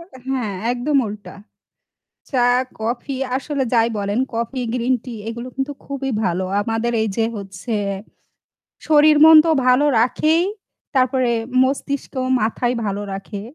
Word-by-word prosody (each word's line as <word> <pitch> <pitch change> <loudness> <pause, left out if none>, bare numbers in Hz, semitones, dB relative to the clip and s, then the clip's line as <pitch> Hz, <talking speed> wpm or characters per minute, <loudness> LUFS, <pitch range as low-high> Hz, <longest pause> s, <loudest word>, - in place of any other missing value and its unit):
উম 335 - -12
অ্যা 260 - -13
হ্যাঁ 250 -6 -1 0.2
একদম 265 +4 0
উল্টা। 205 -3 -8 1.0
চা, 260 - 0 0.4
কফি 240 +4 -3 0.2
আসলে 275 +1 -2
যাই 230 -1 +4
বলেন 205 +2 -1
কফি, 235 +3 -3
গ্রিন 250 +1 +1
টি 250 - -6 0.2
এগুলো 235 +2 -6
কিন্তু 270 +2 -2
খুবই 275 -1 -4
ভালো। 180 +1 0 0.2
আমাদের 225 +2 -1
এই 220 - 0
যে 225 - +2
হচ্ছে 195 +3 -6 1.1
শরীর, 305 -1 +5
মন 320 0 +9
তো 330 - +2 0.2
ভালো 255 +3 +4 0.2
রাখেই। 310 +7 +2 0.5
তারপরে 255 -1 +2 0.3
মস্তিষ্ক, 280 +1 -3 0.3
মাথায় 240 +3 0
ভালো 200 -1 -2
রাখে, 195 +1 -6
245 Hz, 135 wpm, -20 LUFS, 220-270 Hz, 1.1 s, মন